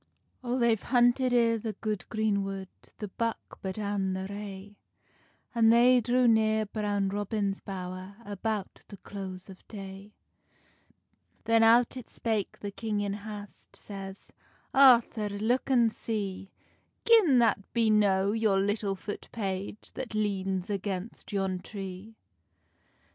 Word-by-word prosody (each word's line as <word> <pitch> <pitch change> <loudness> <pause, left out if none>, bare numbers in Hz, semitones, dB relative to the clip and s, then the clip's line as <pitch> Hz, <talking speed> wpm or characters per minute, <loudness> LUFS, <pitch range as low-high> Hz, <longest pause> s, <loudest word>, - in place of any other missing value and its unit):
O 245 0 -1
they've 235 -4 +2
hunted 245 +1 +3
i 230 -2 +3
the 220 0 -4
good 210 -4 -3
green 215 -3 +1
wood 195 -1 -5 0.3
The 210 - -5
buck 230 +3 -4
but 190 0 -4
an 200 -2 -1
the 190 0 -3
rae, 200 0 -8 0.8
An 230 -2 +4
they 245 +2 +6
drew 245 +2 +3
near 220 -1 +3
Brown 205 -2 -1
Robin's 205 0 -1
bowr, 185 0 -6
About 205 0 -4
the 200 - -11
close 190 -2 -8
of 190 -2 -14
day. 195 0 -9 1.3
Then 225 0 +4
out 235 +3 +5
it 255 - -9
spake 220 -4 -2
the 205 - -4
king 210 0 -3
in 200 -1 -1
hast, 205 0 -9
Says, 195 -1 -9 0.4
"Arthur 240 -5 +5
look 220 +7 0
an 240 -4 +4
see 200 -4 -4 0.6
Gin 420 - +6
that 225 -4 +2
be 230 -2 +3
no 200 -2 +3
your 215 -3 +2
little 205 0 0
foot 205 +2 -7
page 200 -1 -4
That 245 -4 -6
leans 195 -2 -1
against 200 +2 -4
yon 195 -2 -1
tree." 195 +2 -8
205 Hz, 135 wpm, -29 LUFS, 195-225 Hz, 1.3 s, they